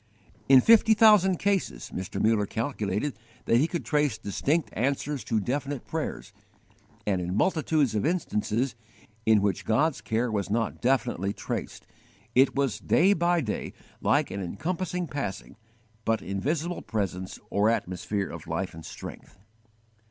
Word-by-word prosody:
In 135 -1 +9
fifty 225 - +6
thousand 210 -4 +6
cases, 190 - -1
Mr. 95 0 -4
Muller 110 -2 +2
calculated 110 +1 -2 0.3
that 115 - +4
he 145 +6 +3
could 170 -1 -4
trace 145 -6 +1
distinct 140 - -1
answers 140 +3 -1
to 110 - +1
definite 135 +5 -3
prayers; 160 -1 -4 0.7
and 95 -3 +1
in 90 +1 -3
multitudes 155 - +2
of 105 - 0
instances 125 - 0 0.5
in 110 -2 +5
which 100 -3 0
God's 140 +1 +1
care 110 +3 -1
was 100 -4 -2
not 115 +1 -1
definitely 120 -6 +1
traced, - - -5 0.5
it 130 +2 +4
was 140 -3 0
day 190 +5 +4
by 175 -1 +2
day 110 -7 -4 0.3
like - - +2
an 100 - -4
encompassing 180 - -3
passing 140 - -5 0.5
but 115 -1 0
invisible 150 - -2
presence 95 -4 -3
or 105 +2 +3
atmosphere 95 -1 -1
of - - -9
life - - -3
and 80 0 -10
strength. - - -10
125 Hz, 140 wpm, -27 LUFS, 105-155 Hz, 0.7 s, In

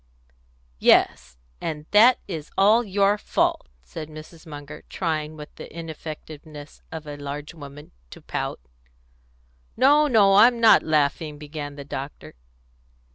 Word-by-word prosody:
"Yes; - - +3 0.2
and 150 -2 -4
that 230 +5 +7
is 160 -6 -6
all 215 +5 +5
your 200 0 +1
fault," - - 0 0.2
said 150 - -8
Mrs. 155 +2 -12
Munger, 145 -1 -9
trying, 155 -3 -3
with 150 0 -10
the - - -10
ineffectiveness 155 -2 -9
of 160 -1 -7
a 145 -1 -7
large 145 +2 -7
woman, 145 -2 -12 0.2
to - - -12
pout. - - -4 1.2
"No, 290 +5 +5
no, 200 -6 +5
I'm 235 +3 +6
not 225 -1 +7
laughing." 150 0 0
began 145 -1 -7
the 140 -1 -9
doctor. 140 0 -7
155 Hz, 130 wpm, -24 LUFS, 145-195 Hz, 1.2 s, that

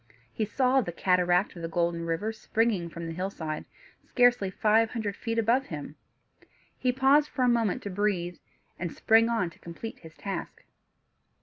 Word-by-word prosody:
He 220 - -1
saw 260 +4 +2
the 175 - -4
cataract 180 +2 +2
of 170 - -8
the 165 - -3
Golden 170 0 -1
River 180 +7 -1
springing 220 -5 0
from 170 0 -7
the 165 - -4
hillside, 160 -4 -4 0.4
scarcely 245 -6 +3
five 220 +3 +3
hundred 215 -4 -3
feet 230 -1 -3
above 235 +4 +2
him. 150 -1 -7 0.8
He 255 - +2
paused 270 +4 +4
for 255 - -1
a - - +4
moment 230 -5 +1
to 200 - -4
breathe, 185 -3 -1 0.4
and 175 -2 -3
sprang 225 +6 +4
on 220 -7 0
to - - -20
complete 170 +7 -8
his 160 -2 -14
task. 195 -1 -6
205 Hz, 170 wpm, -28 LUFS, 170-230 Hz, 0.8 s, paused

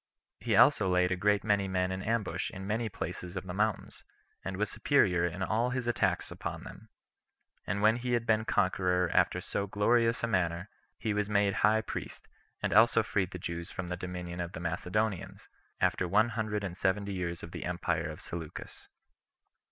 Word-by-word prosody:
He - - 0
also 95 - +6
laid 90 0 +3
a - - +2
great 105 +2 +2
many 100 -2 +2
men 90 -1 0
in 95 0 -3
ambush 110 -1 -1
in 95 0 -8
many 110 +2 -1
places 90 -2 -5
of 95 - -5
the 90 - -5
mountains, 105 +2 -1 0.4
and 95 -1 -4
was 105 +2 +1
superior 100 - +3
in 90 +3 -4
all 115 +5 +1
his 125 -1 -2
attacks 95 -7 0
upon - - -5
them; - - -11 0.8
and 100 +3 -1
when 110 +2 +5
he 125 0 -2
had 120 -1 +1
been 110 -1 +3
conqueror 90 -3 +1
after - - +3
so 100 - -3
glorious 115 +4 +2
a - - +2
manner, 90 -2 0 0.3
he 110 -2 -1
was 105 0 -1
made 100 -1 +3
high 110 +1 +4
priest, - - -7 0.4
and - - +1
also 115 +1 +6
freed 95 -4 0
the 90 - -7
Jews 85 0 -5
from 90 -1 -5
the 90 - -2
dominion 90 -1 -5
of 85 0 -5
the - - -6
Macedonians, 90 +4 -2 0.3
after 90 - +1
one 105 +5 +3
hundred 110 -2 -2
and 90 -3 -4
seventy 100 +1 0
years 85 -2 -3
of 85 - -8
the - - -6
empire 85 -2 -1
[of 75 +3 -8
Seleucus]. 80 -3 -8
95 Hz, 190 wpm, -31 LUFS, 90-110 Hz, 0.8 s, also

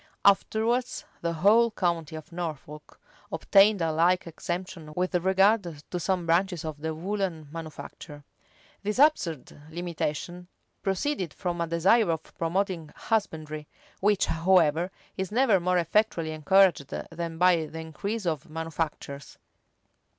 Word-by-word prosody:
[] - - -44
Afterwards 225 +5 +2 0.2
the 170 - 0
whole 215 +8 +5
county 170 -7 -1
of 155 +3 -9
Norfolk 155 -3 -7 0.3
obtained 200 -2 +4
a 165 - +1
like 175 +3 +2
exemption 175 -1 -5
with 180 +1 -1
regard 190 -1 +2
to 180 - -2
some 180 0 -1
branches 170 0 +1
of 150 -2 -6
the 160 0 -3
woollen 180 -3 -3
manufacture.[] 155 -2 -9 0.6
These 210 +2 -2
absurd 170 - +2
limitations 175 +1 -4 0.3
proceeded 195 - -1
from 175 -2 -3
a 170 - 0
desire 175 +6 +3
of 160 -1 -3
promoting 175 -1 -1
husbandry, 155 -9 -2 0.3
which, 205 0 +3
however, 170 0 +3 0.3
is 190 0 -3
never 230 -4 +4
more 180 +1 +1
effectually 170 -1 +1
encouraged 165 -1 +4
than 165 +1 -5
by 175 -2 +4
the 160 +1 -8
increase 200 +7 -4
of 160 -5 -2
manufactures. 155 -3 -5
175 Hz, 130 wpm, -27 LUFS, 160-195 Hz, 0.6 s, whole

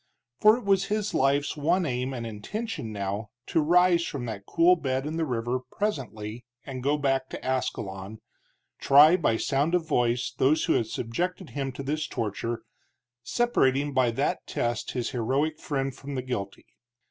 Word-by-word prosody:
For 215 +2 +6
it 250 - -8
was 195 -1 +3
his 210 0 -1
life's 140 +2 +2
one 170 +5 +1
aim 125 -1 -2
and 120 -3 -4
intention 115 - -5
now 100 +1 -3 0.2
to 160 - +1
rise 175 +2 +4
from 140 -6 -4
that 105 -4 -6
cool 170 +2 +5
bed 135 -4 -2
in 155 +2 -3
the 165 -1 0
river 120 0 -1
presently 125 - -4 0.2
and 130 -2 -6
go 145 +3 +1
back 135 -2 0
to - - -7
Ascalon, 105 -5 -3 0.6
try 150 +5 +7
by 145 -11 +1
sound 145 +8 +1
of 170 -3 0
voice 120 -4 +1
those 150 +4 +3
who - - +3
had 115 - +1
subjected 175 - -3
him 135 -2 -3
to 140 - -6
this 155 +3 -2
torture, 115 -1 -3 0.6
separating 140 - +1
by 130 -2 +3
that 115 - -1
test 120 -1 -2
his 125 -2 -2
heroic 135 +6 0
friend 135 -2 -2
from 140 +1 -7
the 130 - -2
guilty. 100 -6 -5
135 Hz, 170 wpm, -27 LUFS, 120-160 Hz, 0.6 s, try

